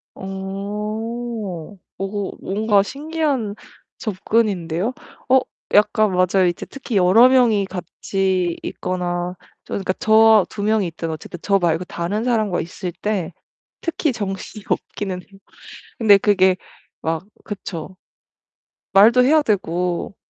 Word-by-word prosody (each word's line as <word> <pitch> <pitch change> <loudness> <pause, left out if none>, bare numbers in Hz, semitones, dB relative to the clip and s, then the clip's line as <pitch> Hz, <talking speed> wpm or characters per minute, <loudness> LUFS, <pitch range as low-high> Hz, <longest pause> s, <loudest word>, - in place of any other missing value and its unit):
어. 205 0 -5 0.2
어 195 +1 -3
뭔가 205 0 +2
신기한 285 -4 -2 0.4
접근인데요. 200 -2 0 0.4
어 265 +1 +6 0.3
약간 210 0 +4
맞아요. 185 +1 +3
이제 175 - -2
특히 250 -5 -5
여러 195 +7 +7
명이 240 -6 +4
같이 185 0 -2
있거나 180 -1 -3 0.3
저 - - -6
그러니까 190 -1 -1
저와 220 -1 +5
2 205 - -5
명이 215 -1 +2
있든 165 0 -5
어쨌든 160 +3 -7
저 200 -1 +3
말고 170 -1 +1
다른 180 +5 -3
사람과 215 -7 +1
있을 175 +1 -5
때 205 -5 -1 0.5
특히 320 -3 -1
정신이 205 -1 -5
없기는 185 -3 -3
해요. 195 +2 -19 0.6
근데 210 -4 +6
그게 190 -2 +4 0.5
막 160 +2 -2 0.2
그쵸. 190 -3 -6 1.0
말도 230 +6 +7
해야 305 +4 +5
되고 180 - -1
200 Hz, 235 characters per minute, -21 LUFS, 180-220 Hz, 1.0 s, 여러